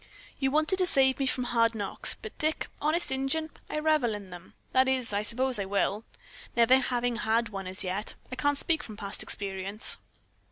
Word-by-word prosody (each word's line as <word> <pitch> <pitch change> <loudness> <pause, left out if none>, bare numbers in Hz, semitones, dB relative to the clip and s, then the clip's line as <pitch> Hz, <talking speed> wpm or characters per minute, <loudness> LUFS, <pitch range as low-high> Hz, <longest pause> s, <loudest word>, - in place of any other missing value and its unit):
You 270 - +1
wanted 310 +6 +2
to 365 - +4
save 265 -4 +6
me 270 - 0
from 255 0 -1
hard 230 -1 +2
knocks, 205 -2 +3
but, 215 - -10
Dick, 310 +1 0 0.2
honest 310 +2 +1
Injun, 270 +4 -1 0.2
I - - -3
revel 305 -8 +1
in 200 -3 -10
them. 175 0 -12 0.2
That 260 0 +3
is, 255 -4 -1
I 205 - +1
suppose 250 +2 +1
I 200 - -2
will. 200 +2 -1 0.5
Never 235 +2 +5
having 245 -2 0
had 225 0 0
one 195 -2 -6
as 185 +1 -2
yet, 190 +3 -4 0.2
I - - -4
can't 290 +2 0
speak 320 +1 0
from 215 -7 -10
past 200 -1 -7
experience." 195 +1 -1
245 Hz, 195 wpm, -28 LUFS, 205-270 Hz, 0.5 s, save